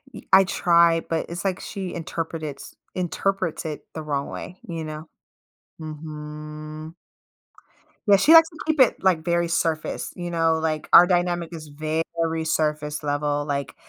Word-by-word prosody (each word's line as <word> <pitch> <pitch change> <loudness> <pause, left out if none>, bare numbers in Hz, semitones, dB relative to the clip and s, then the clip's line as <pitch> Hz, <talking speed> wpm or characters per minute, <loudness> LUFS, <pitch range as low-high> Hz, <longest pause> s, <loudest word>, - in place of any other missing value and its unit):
Eh, - - -8
I 190 0 +9
try, 170 -2 +3
but 165 -1 -2
it's 170 +2 -6
like 190 -1 0
she 190 -4 -6
interpret 165 -1 -4
it's 145 -2 -7 0.2
interprets 185 -1 -1
it 155 -1 -4
the 160 - -5
wrong 140 -2 -2
way, 180 - -8
you 165 -2 -4
know? 155 +1 -7 0.7
Mhm. 155 0 -8 1.1
Yeah, 200 - +7
she 305 +11 +5
likes 325 0 +8
to 320 - -15
keep 315 -1 0
it, 260 - +6
like, 180 -4 +3
very 170 0 +1
surface, 165 -1 -1
you 175 -1 -5
know, 165 -1 +2
like, 155 -1 -2
our 175 - +10
dynamic 175 -2 0
is 155 -2 -8
very 160 +2 -2
surface 150 -1 -1
level, 145 0 -1
like 140 -1 -3
160 Hz, 155 wpm, -24 LUFS, 155-175 Hz, 1.1 s, our